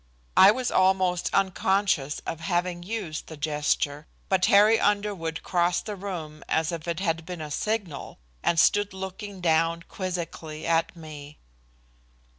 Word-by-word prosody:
I 190 - +9
was 245 +4 +1
almost 185 -1 +2
unconscious 190 -6 +1
of 165 - -4
having 175 0 -1
used 185 -5 -5
the 160 - -9
gesture. 150 0 -1 0.2
But 190 -1 +3
Harry 210 +3 +6
Underwood 200 -6 0
crossed 175 -1 +1
the 210 - -4
room 170 -6 -6
as 160 0 +1
if 170 -1 -6
it 170 0 -2
had 165 -3 -1
been 180 +1 -7
a 155 -1 -6
signal, 195 -5 -3 0.2
and 170 - +2
stood 205 +3 +3
looking 190 +1 -7
down 165 0 +2
quizzically 170 -4 -5
at 165 0 +1
me. 150 -3 -10
175 Hz, 140 wpm, -26 LUFS, 160-195 Hz, 0.2 s, I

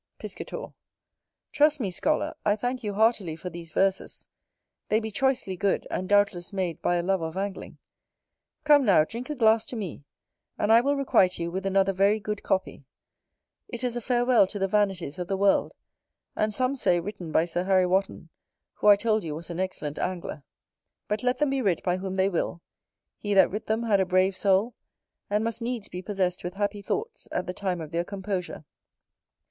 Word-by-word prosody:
Piscator. - - -7 0.8
Trust 300 0 +3
me, 200 -7 -2
Scholar, - - 0
I 205 -1 +3
thank 245 +3 -3
you 205 -2 -3
heartily 210 -6 +2
for 180 +3 -7
these 165 -1 -9
Verses: 195 +2 -1 0.6
they 215 - +3
be 220 -1 -5
choicely 260 -5 0
good, 200 +1 0
and 185 - -3
doubtless 205 -4 +2
made 185 -4 -3
by 175 - +1
a 175 - 0
lover 185 -2 0
of 160 +3 -6
angling. 200 0 -5 0.9
Come, 295 -2 +6
now, 190 -9 +5
drink 235 - -7
a 300 - -2
glass 225 -3 +4
to - - -6
me, 190 -10 -5 0.5
and 210 - +1
I 230 - +7
will 280 +3 +1
requite 225 -9 +3
you 170 0 -3
with 190 +2 -3
another 195 0 +2
very 200 +3 +3
good 210 0 -4
copy: 190 -6 -2 0.8
it 240 +1 -5
is 245 -1 -1
a 240 - -3
farewell 245 -3 +3
to 205 - -5
the 195 -1 0
vanities 190 -6 0
of 180 - -3
the 195 - -1
world, 200 0 +3 0.6
and 215 0 0
some 255 +5 0
say 175 -9 +2
written 175 -2 -6
by 160 - +3
Sir 175 +1 -2
Harry 190 -1 +4
Wotton, 185 -2 -1 0.4
who - - -2
I 205 - +10
told 215 +1 0
you 155 -3 -4
was 165 +2 -7
an 170 - -5
excellent 155 -6 -3
angler. 175 -5 -4 0.6
But 210 +1 -1
let 250 0 +1
them 295 -2 +1
be 275 -1 0
writ 195 -7 0
by 180 0 +1
whom 190 0 -4
they 190 0 +3
will, 175 -2 -2 0.6
he 205 -1 -1
that 190 - +6
writ 210 +3 -5
them 220 +2 0
had 210 -4 +3
a 190 - +1
brave 185 +1 +2
soul, 195 +5 +2 0.6
and 210 +1 +1
must 230 +1 -3
needs 235 -3 -3
be 180 - -6
possess 185 -2 -1
with 175 +2 -5
happy 205 0 -2
thoughts 445 - -4
at - - -2
the 180 - -4
time 185 -2 -2
of 160 -2 -7
their 170 +1 0
composure. 190 -4 -5
195 Hz, 195 wpm, -26 LUFS, 180-220 Hz, 0.9 s, I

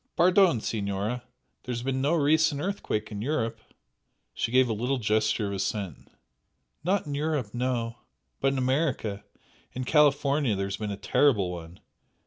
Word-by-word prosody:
"Pardon, 180 - +4
Signora! 105 +3 -2 0.4
There 125 - -4
has 120 0 -4
been 130 0 -1
no 145 +5 +2
recent 155 -1 +3
earthquake 150 - -2
in 105 -1 -5
Europe." 115 -3 -1 0.7
She - - -2
gave 130 0 +5
a 115 - 0
little 125 +5 -1
gesture 110 -1 +1
of - - -4
assent. 100 - -3 0.8
"Not 190 +3 +1
in 145 - -4
Europe 145 -7 -1
no! 120 -1 -2 0.4
But 135 - +2
in - - -2
America 130 -6 0 0.5
in 130 - -3
California 140 -3 +3
there 100 0 -1
has 100 0 -4
been 105 0 -4
a 100 - -4
terrible 105 -8 +2
one!" 85 0 -9
125 Hz, 155 wpm, -27 LUFS, 105-145 Hz, 0.8 s, gave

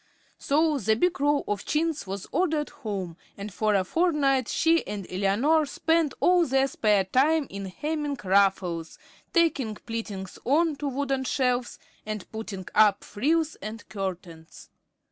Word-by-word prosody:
So 300 0 +2
the 220 -1 +2
big 350 +4 0
roll 290 0 +2
of 205 -1 -2
chintz 310 -5 -1
was 195 0 -5
ordered 315 -2 0
home, 190 -6 -5 0.2
and 200 0 -7
for 215 +1 +1
a 190 - +3
fortnight 275 - +1
she 330 0 +2
and 200 -2 -5
Eleanor 230 +12 +2
spent 320 +1 +1
all 355 -1 +4
their 270 +1 +3
spare 210 -6 +2
time 285 +10 +2
in 195 0 -5
hemming 295 +7 -3
ruffles, 190 -4 +1 0.3
tacking 300 - +1
pleatings 210 -5 -6
on 310 +4 +2
to 290 - -3
wooden 270 0 -1
shelves, 250 -2 0 0.3
and 215 -2 -5
putting 215 -4 -6
up 210 -2 +4
frills 310 +8 0
and 215 +1 -8
curtains. 180 -5 -7
245 Hz, 145 wpm, -26 LUFS, 200-300 Hz, 0.3 s, all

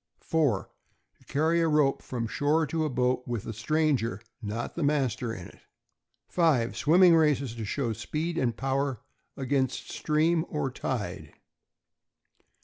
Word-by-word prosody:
4. 145 -11 +1 0.5
To - - -24
carry 160 +4 +1
a 165 - +3
rope 150 -3 +2
from 120 -3 -4
shore 150 +7 +1
to 160 +1 -1
a - - 0
boat 125 -1 +1
with 120 -4 -3
a 115 - -4
stranger, 120 -3 0 0.2
not 110 +2 -4
the 170 - -4
master, 135 -5 0
in 90 -5 -7
it. - - -14 0.7
5. 150 -10 +2
Swimming 175 +2 +6
races, 145 -6 +2
to 115 -2 -5
show 115 +2 -1
speed 160 - -3
and 120 -7 0
power 135 -2 -1 0.4
against 135 -1 -1
stream 160 +2 +1
or 75 - -2
tide. - - -4
140 Hz, 140 wpm, -28 LUFS, 120-155 Hz, 0.7 s, Swimming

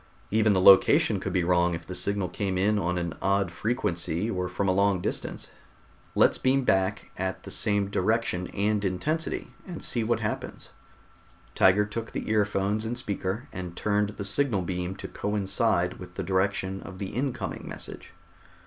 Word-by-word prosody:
Even 110 0 +4
the 95 - +3
location 95 +1 +6
could - - -3
be 90 - +1
wrong 85 0 +2
if 85 0 -8
the 90 - -7
signal 100 0 -1
came 95 +1 -2
in 105 +3 +2
on 90 -1 -1
an 85 -2 -2
odd 100 -2 +1
frequency 100 -3 -1
or 90 -3 -2
from 90 +2 -1
a - - +4
long 100 0 +2
distance. - - -3 0.6
Let's - - +4
beam 135 +1 +2
back 95 -2 +1
at 95 0 -3
the - - -8
same 100 -2 +1
direction 100 -2 0
and 105 +1 0
intensity 145 - -2 0.2
and 175 -3 -7
see 120 - +1
what 115 0 +1
happens." 110 0 -4 0.8
Tiger 95 +2 +4
took 115 +2 -6
the - - -3
earphones 105 0 +1
and 115 +2 -3
speaker, 105 +2 -3
and 90 -2 -6
turned 105 -1 +1
the 105 -1 -6
signal 105 -1 +1
beam 90 +1 -3
to - - -7
coincide 100 -2 0
with 90 -1 -10
the - - -3
direction 95 0 0
of 95 - -9
the 95 0 -4
incoming 120 -3 -3
message. - - -8
100 Hz, 170 wpm, -27 LUFS, 95-110 Hz, 0.8 s, location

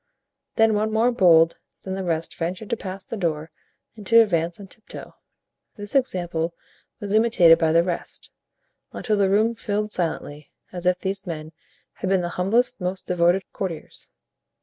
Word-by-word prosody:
Then 225 0 +4
one 215 +1 0
more 225 +3 +2
bold 165 -7 +4 0.2
than 190 - -5
the 190 0 -3
rest 165 -2 -2
ventured 180 +5 -4
to - - +2
pass 195 -2 -7
the - - -6
door 160 -5 -2 0.4
and 215 - -11
to 230 - +7
advance 170 -5 +1
on 200 - -9
tiptoe. 210 +3 -12 0.6
This 205 -1 -5
example 175 - -1 0.4
was 205 -1 -4
imitated 215 -7 +5
by 160 -1 +2
the 165 +1 +4
rest, 175 -1 -5 0.6
until 215 -3 -1
the 200 -2 +2
room 215 +4 +3
filled 210 -1 -3
silently, 150 -4 -3 0.2
as 180 -1 -4
if 180 0 +3
these 190 +1 -3
men 155 -2 -6 0.4
had 185 - -4
been 190 -1 +2
the 175 - -3
humblest, 220 +7 0
most 185 +1 -3
devoted 180 +2 +2
courtiers. 180 -5 -6
185 Hz, 165 wpm, -23 LUFS, 170-210 Hz, 0.6 s, to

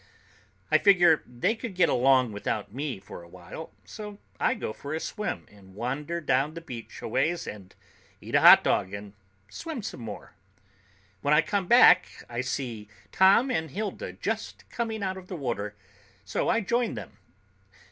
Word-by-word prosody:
I - - +6
figure 175 -6 +5
they 125 - 0
could 230 -3 -7
get 180 -2 +4
along 130 -1 +3
without 105 0 -3
me 135 -4 -4
for 95 -2 -10
a 85 - -14
while, 90 - -10
so 210 -1 -8 0.2
I 260 - +2
go 110 - -4
for 145 +6 -6
a - - -2
swim 210 +5 -4
and 95 -2 -17
wander 140 +9 -3
down 140 0 0
the - - -5
beach 125 -9 -9
a - - -3
ways 170 +9 0
and 100 -3 -9 0.4
eat - - -10
a - - +5
hot - - +9
dog 95 +1 0
and 100 0 -9 0.4
swim 320 - -6
some 205 - -6
more. 110 -3 -8 0.9
When 145 +5 +3
I 150 - +5
come 200 -4 -1
back, 210 -6 +6
I 120 0 -3
see 125 -5 -4 0.2
Tom 200 +8 +5
and 160 -9 -1
Hilda 215 - -4
just - - -4
coming 225 -3 -3
out 190 -1 -2
of 185 -1 -11
the 185 - -6
water, 105 -7 -3 0.5
so 100 - -1
I 230 - +2
join 235 +3 0
them. - - -9
150 Hz, 175 wpm, -27 LUFS, -, 0.9 s, hot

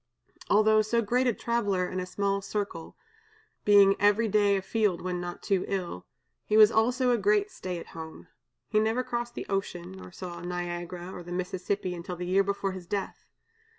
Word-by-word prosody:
Although 215 +1 +5
so 230 +2 +1
great 250 +5 +1
a - - +4
traveler 205 -6 0
in 185 - -4
a 180 - -4
small 200 +1 -1
circle 200 -5 -5 0.7
being 200 -1 +7
every 205 +3 +4
day 205 -1 +3
a - - -2
field 210 -5 +1
when 180 -1 -3
not 175 0 -6
too 195 -2 +1
ill, 180 - -4 0.4
he 215 - +1
was 215 0 +8
also 245 +3 +2
a 240 - +2
great 415 0 +2
stay 185 - -5
at 170 - -9
home. 160 -1 -9 0.4
He 215 - +2
never 225 +4 +1
crossed 240 -1 -4
the - - -5
ocean, 185 -2 -3
nor 190 -1 -11
saw 175 -1 -7
Niagara 175 0 -5
or - - -7
the 175 0 -10
Mississippi 185 +1 -2
until 175 +1 -6
the 180 +1 -5
year 190 +2 +3
before 200 0 -1
his 185 -2 -8
death. 200 0 -4
195 Hz, 185 wpm, -28 LUFS, 180-215 Hz, 0.7 s, was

